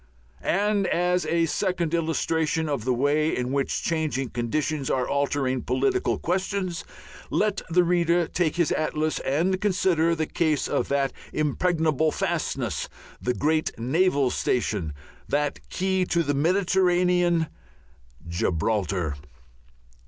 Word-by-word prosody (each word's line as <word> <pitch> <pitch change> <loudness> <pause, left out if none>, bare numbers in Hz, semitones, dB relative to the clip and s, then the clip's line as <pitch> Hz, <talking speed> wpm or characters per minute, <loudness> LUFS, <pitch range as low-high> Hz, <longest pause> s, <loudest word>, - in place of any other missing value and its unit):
And 205 0 +1
as 180 +1 +1
a 170 0 +2
second 170 -1 -1
illustration 160 -1 0
of 140 -7 -2
the 130 - +2
way 145 +4 +1
in 125 0 -2
which 140 0 -1
changing 155 -6 -1
conditions 135 +4 -1
are 130 -2 0
altering 140 -2 0
political 385 -2 0
questions, 185 0 -2 0.5
let 210 -1 +1
the 175 +2 +4
reader 175 0 +2
take 170 -4 0
his 170 -2 +1
atlas 155 0 0
and 175 +8 0
consider 180 -5 +2
the 160 -1 -1
case 155 -2 0
of - - 0
that 140 -1 0 0.2
impregnable 155 0 +1
fastness, 140 - -2 0.3
that 125 0 -1
great 155 +2 0
naval 140 +2 +2
station, 100 -10 -1 0.4
that 145 0 0
Key 190 0 0
to 170 -1 +1
the 145 -1 0
Mediterranean, 180 +1 +2 0.8
Gibraltar. 90 0 0
160 Hz, 120 wpm, -25 LUFS, 140-180 Hz, 0.8 s, the